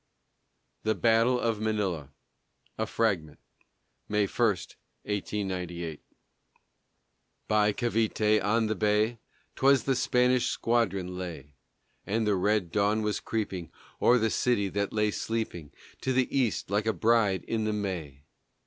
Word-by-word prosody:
THE 110 0 0
BATTLE 115 +2 +3
OF 115 -3 -1
MANILA 100 -10 -1 0.7
A - - 0
FRAGMENT 95 -10 -1 0.7
[May 105 -1 +2
1, - - -10 0.6
1898] 90 -6 -3 1.5
By 105 -1 +3
Cavité 110 -2 +1
on 110 +3 +2
the 110 - 0
bay 110 +2 +1 0.4
'Twas 135 -2 +4
the 135 - +1
Spanish 125 0 +2
squadron 95 -6 0
lay; 80 -6 -7 0.5
And 110 +2 0
the 105 - +2
red 95 -2 +1
dawn 105 +2 +1
was 105 -1 -1
creeping 95 -7 -4 0.3
O'er 125 - +5
the 110 -2 +1
city 110 -6 +1
that 100 +1 -2
lay 105 -1 +1
sleeping 105 -10 -4 0.3
To 130 - 0
the 130 +1 +1
east, 120 -7 0
like 105 +2 +1
a 110 - +2
bride, 105 -1 +2
in 110 -1 -2
the 110 - 0
May. 85 -9 -4
105 Hz, 130 wpm, -28 LUFS, 95-115 Hz, 1.5 s, O'er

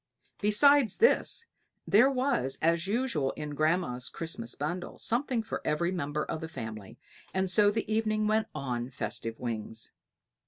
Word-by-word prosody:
Besides 245 +5 +5
this 465 0 +3 0.4
there 235 +7 +6
was, 255 - 0
as 170 +2 +2
usual 205 - 0
in 150 -1 -6
grandmamma's 155 -5 0
Christmas 160 -8 -5
bundle, 175 +5 -4
something 240 -1 -1
for 220 - -4
every 170 +4 0
member 150 -4 -2
of 160 - -4
the 160 - -4
family; 110 -6 -7 0.4
and 190 -1 0
so 205 +2 +5
the 220 +2 -1
evening 215 -1 +1
went 215 +1 +2
on 125 -4 -3
festive 115 -3 -5
wings. 115 -2 -5
170 Hz, 145 wpm, -30 LUFS, 135-220 Hz, 0.4 s, there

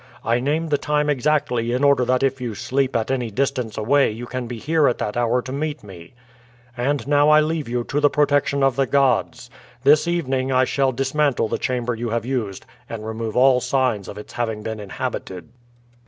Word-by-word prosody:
I 115 +2 +2
name 155 +5 -1
the 145 - +1
time 150 0 0
exactly 125 -4 0
in 130 +3 0
order 140 -3 +4
that 125 +1 +1
if 135 -1 0
you 120 -4 -4
sleep 130 +4 -1
at 115 +2 0
any 125 -3 -1
distance 125 -1 -2
away 135 +6 +3
you 115 +3 -6
can 125 0 -5
be 120 0 -6
here 150 +4 +2
at 120 - +1
that 105 - -3
hour 120 +1 +1
to 130 - -7
meet 145 -1 -3
me; 90 0 -13 0.6
and 135 +3 -1
now 145 +1 +4
I 155 0 +7
leave 155 -3 -1
you 120 0 -1
to 145 - -2
the 145 0 +4
protection 145 -1 +1
of 135 -2 +2
the 135 -1 +2
gods. 130 -3 +1 0.3
This 150 +4 +5
evening 135 -6 -1
I 130 0 +4
shall 135 0 +1
dismantle 135 -2 0
the - - -2
chamber 125 -1 -1
you 115 +1 -4
have 115 +1 -2
used 115 -7 -3 0.2
and 110 -2 -6
remove 110 0 -4
all 130 0 +5
signs 125 -6 0
of 100 - -8
its 105 - -10
having 110 -3 -3
been 110 0 -5
inhabited." 95 -1 -6
130 Hz, 205 wpm, -21 LUFS, 115-140 Hz, 0.6 s, I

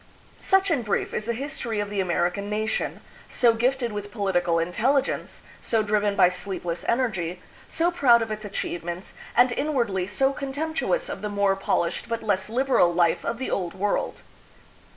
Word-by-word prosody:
Such 385 -1 +3
in 285 -6 +2
brief 210 -3 -1
is 215 - -2
the 235 - +1
history 240 -4 -3
of 205 0 -3
the 205 - -2
American 180 +2 0
nation, 215 +1 -1 0.3
so 240 -3 +4
gifted 245 +1 0
with 205 0 -5
political 180 -5 0
intelligence, 235 +12 0 0.2
so 225 -2 +1
driven 205 -1 +1
by 180 - +6
sleepless 180 -2 -3
energy, 200 -9 0 0.3
so 340 +2 +1
proud 245 -9 +5
of 220 - -6
its 215 0 -4
achievements, 175 -3 -4 0.2
and 245 +1 +6
inwardly 235 -10 0
so 270 +7 +2
contemptuous 315 - -2
of - - -5
the 210 - -3
more 200 -1 +2
polished 195 +1 -1
but 230 -1 -2
less 195 -2 0
liberal 250 -7 +3
life 170 -1 +2
of 230 - -2
the 260 - -4
Old 180 -2 -2
World. 200 +2 -1
210 Hz, 165 wpm, -25 LUFS, 190-255 Hz, 0.3 s, by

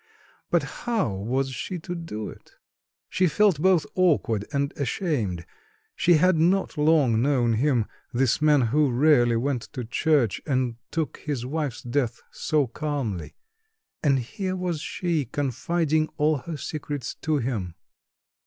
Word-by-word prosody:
But - - +2
how 225 - -2
was 130 +8 -1
she 180 +8 -4
to 175 - -5
do 165 -12 -5
it? - - -13 0.5
She 185 -1 +2
felt 185 -2 +3
both 185 -3 +4
awkward 145 - +2
and 140 -1 -1
ashamed. 120 - -2 0.5
She 175 - +4
had 180 +2 +4
not 180 +4 +2
long 150 -7 +3
known 125 -4 +2
him, 120 -1 +2 0.3
this 130 +2 +1
man 150 -2 +5
who 140 +5 +2
rarely 125 -2 +4
went 125 +1 0
to 125 -4 -4
church, 135 - +1
and 130 -5 -1
took 160 -6 -2
his 140 -5 -4
wife's 145 -2 -3
death 120 -1 -1
so 150 -2 +1
calmly 125 - -4 0.7
and 140 -3 +3
here 185 - -3
was 180 -4 -2
she, 165 -2 -1
confiding 155 +5 0
al 150 0 +3
her 165 +3 -6
secrets 145 -3 -4
to 155 -1 +1
him.... 110 - -3
145 Hz, 140 wpm, -25 LUFS, 120-160 Hz, 0.7 s, man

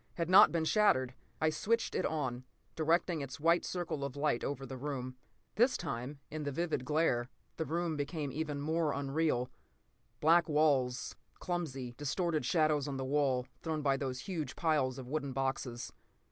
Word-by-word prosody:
had 170 0 -2
not 190 - +9
been 165 -2 0
shattered. 130 - +3 0.3
I 155 0 +2
switched 225 +9 0
it - - +1
on, 130 -6 -2 0.3
directing 165 +1 +1
its 140 +1 -6
white 165 +3 +3
circle 170 -5 -3
of 140 -1 -4
light 145 -4 0
over 140 -1 -3
the 135 - -7
room. 130 -2 -4 0.4
This 245 +4 +4
time, 140 -3 -5
in 155 +1 -4
the 145 -1 -2
vivid 160 -3 -1
glare, 140 -5 +1 0.3
the 160 - -1
room 165 +1 -1
became 145 0 -3
even 150 0 -3
more 160 0 +1
unreal. 140 -3 0 0.7
Black 170 +2 +4
walls, 140 -5 +2 0.2
clumsy, 135 -9 -3
distorted 155 +1 -1
shadows 155 -1 +2
on 140 -1 -3
the 130 - -3
wall, 135 -2 +1 0.2
thrown 155 -2 -2
by 140 -1 +3
those 130 -2 -3
huge 175 -7 -4
piles 150 -6 +1
of 130 -2 -7
wooden 140 -1 -2
boxes. 130 -2 -3
150 Hz, 165 wpm, -33 LUFS, 130-160 Hz, 0.7 s, not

